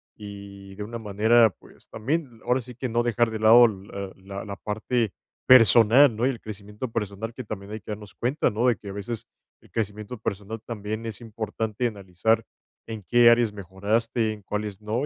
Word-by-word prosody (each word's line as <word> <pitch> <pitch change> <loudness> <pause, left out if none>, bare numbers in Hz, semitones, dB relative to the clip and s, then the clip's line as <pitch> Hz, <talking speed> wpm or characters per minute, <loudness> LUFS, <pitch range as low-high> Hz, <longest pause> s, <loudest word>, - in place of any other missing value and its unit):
Y, 100 -2 -10
de 105 - -5
una 115 +3 -6
manera, 110 +1 +3
pues - - -20
también, 130 0 -3
ahora 125 +2 +2
sí 125 +1 -11
que 130 +2 -4
no 120 +1 +1
dejar 120 0 +2
de 110 -1 -4
lado, 115 +3 +8 0.3
ah, 100 -1 -5
la 95 +1 -8
la 100 -1 -6
parte 110 +2 -1 0.3
personal, 120 +2 +7
¿no?, 115 +3 0
y - - +3
el 125 -4 -4
crecimiento 105 +3 -7
personal 110 0 -4
que 130 - -7
también 100 -2 -7
hay 110 - -6
que 105 - -8
darnos 105 -1 -8
cuenta, 130 +6 0
¿no?, 115 +4 0
de 120 -4 +3
que, 100 - -10
a - - -6
veces, 110 +3 -6 0.3
el - - -21
crecimiento 105 +2 -4
personal 105 +1 -5
también 110 0 -5
es 110 -2 -5
importante, 110 0 -4
analizar 100 +1 0 0.4
en 110 -2 -6
qué 120 +4 +6
áreas 120 -2 +4
mejoraste, 105 +4 -1
en 105 -1 -8
cuáles 105 0 -4
no, 110 +6 -1
110 Hz, 190 wpm, -25 LUFS, 100-120 Hz, 0.4 s, lado